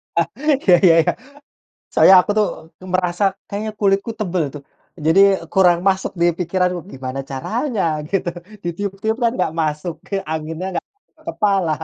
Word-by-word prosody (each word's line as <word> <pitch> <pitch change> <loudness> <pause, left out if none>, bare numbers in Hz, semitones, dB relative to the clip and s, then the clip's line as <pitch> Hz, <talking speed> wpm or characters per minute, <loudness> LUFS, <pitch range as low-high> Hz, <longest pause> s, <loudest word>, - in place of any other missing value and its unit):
Ah, 170 -2 +2 0.4
iya 185 - +5
iya 165 - +7
iya. 175 - +1 0.8
Soalnya 190 - +7
aku 205 - -3
tuh 210 - +4 0.5
merasa 180 +1 0 0.3
kayaknya 215 +2 -4
kulitku 200 +2 +2
tebel 180 -5 -1
tuh, 145 - -8 0.4
jadi 170 +5 +5 0.3
kurang 180 -3 +4
masuk 190 0 0
di - - +4
pikiran 180 +1 0 0.2
gimana 130 +1 -5
caranya, 220 - -2 0.3
gitu. 195 -3 0 0.4
Ditiup-tiup 200 +5 -3
kan 235 - +4
enggak 155 - -1
masuk, 155 +2 -2
ke - - -5 0.2
anginnya 160 +3 -4
enggak 180 - -4 0.4
kepala. 195 - +1
185 Hz, 140 wpm, -19 LUFS, 165-200 Hz, 0.8 s, iya